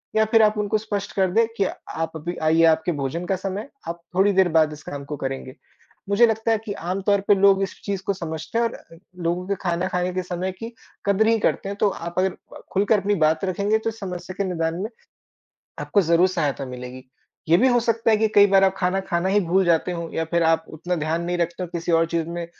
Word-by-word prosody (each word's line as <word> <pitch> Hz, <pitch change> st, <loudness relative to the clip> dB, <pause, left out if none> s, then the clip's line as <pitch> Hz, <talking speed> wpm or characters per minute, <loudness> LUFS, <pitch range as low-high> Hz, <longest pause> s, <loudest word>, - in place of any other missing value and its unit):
या 220 Hz, 0 st, +4 dB
फिर 225 Hz, +1 st, +4 dB
आप 215 Hz, 0 st, +3 dB
उनको 210 Hz, +1 st, +1 dB
स्पष्ट 210 Hz, -2 st, -4 dB
कर 190 Hz, -2 st, +2 dB
दें 230 Hz, +4 st, +4 dB
कि 195 Hz, -, +2 dB
आप 165 Hz, -3 st, -5 dB
अभी 170 Hz, +3 st, -5 dB
आइए 160 Hz, +1 st, +4 dB
आपके 160 Hz, +1 st, +3 dB
भोजन 160 Hz, +6 st, -3 dB
का 190 Hz, -, 0 dB
समय, 195 Hz, +6 st, -5 dB, 0.2 s
आप 170 Hz, 0 st, -5 dB
थोड़ी 195 Hz, +2 st, +4 dB
देर 190 Hz, -1 st, +4 dB
बाद 155 Hz, -1 st, +4 dB
इस 150 Hz, -, -12 dB
काम 140 Hz, -1 st, -6 dB
को 150 Hz, -, -5 dB
करेंगे। 135 Hz, 0 st, -5 dB, 0.5 s
मुझे 200 Hz, +4 st, +5 dB
लगता 220 Hz, 0 st, 0 dB
है 225 Hz, -, +3 dB
कि 205 Hz, -, -3 dB
आम 185 Hz, 0 st, -4 dB
तौर 200 Hz, -1 st, +4 dB
पे 205 Hz, -, +6 dB
लोग 195 Hz, 0 st, +4 dB
इस 195 Hz, -, -6 dB
चीज़ 200 Hz, -2 st, -3 dB
को 200 Hz, -, +1 dB
समझते 160 Hz, +1 st, -5 dB
हैं 235 Hz, -, +2 dB
और 230 Hz, -, -2 dB
अ, 165 Hz, -, -14 dB, 0.2 s
लोगों 175 Hz, +1 st, -2 dB
के 200 Hz, -, 0 dB
खाना 175 Hz, 0 st, 0 dB
खाने 180 Hz, -1 st, -1 dB
के 185 Hz, 0 st, -2 dB
समय 180 Hz, +1 st, -3 dB
की 225 Hz, +6 st, -9 dB, 0.3 s
कदर 200 Hz, +2 st, +3 dB
ही 225 Hz, 0 st, +4 dB
करते 195 Hz, -, 0 dB
हैं। 200 Hz, -, -4 dB
तो 205 Hz, -, +3 dB
आप 170 Hz, -2 st, -6 dB
अगर 190 Hz, 0 st, +2 dB
अ, -, -, -15 dB
खुलकर 205 Hz, +2 st, +3 dB
अपनी 205 Hz, +2 st, 0 dB
बात 160 Hz, +4 st, +1 dB
रखेंगे 200 Hz, +3 st, +1 dB
तो 220 Hz, +1 st, -2 dB
इस 225 Hz, 0 st, -9 dB
समस्या 180 Hz, -2 st, -6 dB
के 200 Hz, -, 0 dB
निदान 165 Hz, -2 st, -1 dB
में 215 Hz, -, -3 dB, 0.9 s
आपको 205 Hz, -, +2 dB
ज़रूर 170 Hz, +2 st, +4 dB
सहायता 150 Hz, -6 st, -1 dB
मिलेगी। 125 Hz, 0 st, -8 dB, 0.4 s
ये 170 Hz, -, +6 dB
भी 260 Hz, +6 st, +4 dB
हो 245 Hz, -1 st, +3 dB
सकता 230 Hz, 0 st, +1 dB
है 220 Hz, -, +5 dB
कि 220 Hz, +1 st, +2 dB
कई 205 Hz, 0 st, +8 dB
बार 195 Hz, 0 st, +5 dB
आप 190 Hz, 0 st, +2 dB
खाना 190 Hz, 0 st, 0 dB
खाना 180 Hz, -1 st, -1 dB
ही 205 Hz, +2 st, +3 dB
भूल 190 Hz, +1 st, +2 dB
जाते 170 Hz, +1 st, +2 dB
हो 170 Hz, -1 st, -4 dB
या 165 Hz, -, 0 dB
फिर 170 Hz, 0 st, +2 dB
आप 160 Hz, 0 st, +2 dB
उतना 170 Hz, +3 st, -3 dB
ध्यान 160 Hz, +2 st, -1 dB
नहीं 175 Hz, 0 st, -1 dB
रखते 170 Hz, +1 st, -2 dB
हो -, -, -2 dB
किसी 170 Hz, 0 st, -2 dB
और 165 Hz, 0 st, +4 dB
चीज़ 165 Hz, -1 st, -2 dB
में 170 Hz, 0 st, -4 dB
185 Hz, 250 wpm, -23 LUFS, 165-200 Hz, 0.9 s, कई